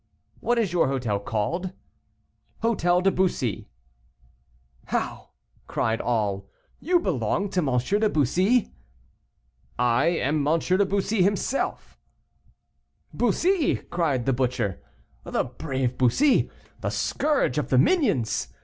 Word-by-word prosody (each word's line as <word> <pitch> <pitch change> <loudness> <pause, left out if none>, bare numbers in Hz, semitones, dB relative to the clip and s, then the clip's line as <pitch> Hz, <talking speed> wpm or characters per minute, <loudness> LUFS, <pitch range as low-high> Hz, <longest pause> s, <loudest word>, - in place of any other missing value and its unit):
"What 240 0 0
is 210 -7 0
your 175 - +3
hotel 125 -7 -1
called?" 140 - -2 0.9
"Hôtel 180 -6 +2
de 195 - +4
Bussy." 175 - -1 1.2
"How!" - - -3 0.4
cried 115 0 -1
all, 100 -5 -1 0.3
"you 355 +3 +2
belong 205 - -1
to 185 - 0
M. 135 -7 +1
de 205 - +1
Bussy?" 190 - +2 1.0
"I 120 +3 +2
am 155 -3 +1
M. 160 +2 +3
de 185 +4 +2
Bussy 200 +1 0
himself." 200 +8 -1 1.1
"Bussy," 320 - +2
cried 150 -9 -2
the 135 - +2
butcher, 125 -6 -1 0.4
"the - - -1
brave 130 0 -3
Bussy, 250 - +3 0.3
the - - -2
scourge 300 0 0
of - - -3
the - - +3
minions!" 130 - +2
170 Hz, 115 wpm, -25 LUFS, 125-205 Hz, 1.2 s, de